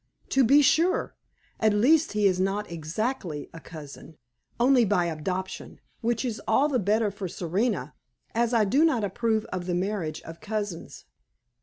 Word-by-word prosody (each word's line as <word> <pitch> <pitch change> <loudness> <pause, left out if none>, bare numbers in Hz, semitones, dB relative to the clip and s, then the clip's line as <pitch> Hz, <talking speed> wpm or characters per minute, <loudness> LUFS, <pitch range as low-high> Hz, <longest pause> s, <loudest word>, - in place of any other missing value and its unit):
"To 270 - +3
be 280 +5 +6
sure. 355 - +2 0.4
At 215 -1 +3
least, 295 +8 +3
he 210 -1 +1
is 185 -2 +3
not 195 +1 -1
exactly 170 - -4
a 165 - -9
cousin, 155 -1 -11 0.4
only 250 0 +5
by 190 -4 +2
adoption; 180 +4 -4 0.2
which 235 +1 -1
is 225 -3 -3
all 270 +6 +3
the 270 -4 0
better 210 +2 +1
for 195 -1 -5
Serena, 175 - -2 0.4
as 235 +1 +1
I 225 -3 +3
do 270 +10 +3
not 260 -10 +2
approve 220 +2 0
of 180 -1 -4
the 175 - 0
marriage 180 -4 -2
of 165 0 -10
cousins." 205 -5 -5
210 Hz, 160 wpm, -26 LUFS, 175-235 Hz, 0.4 s, be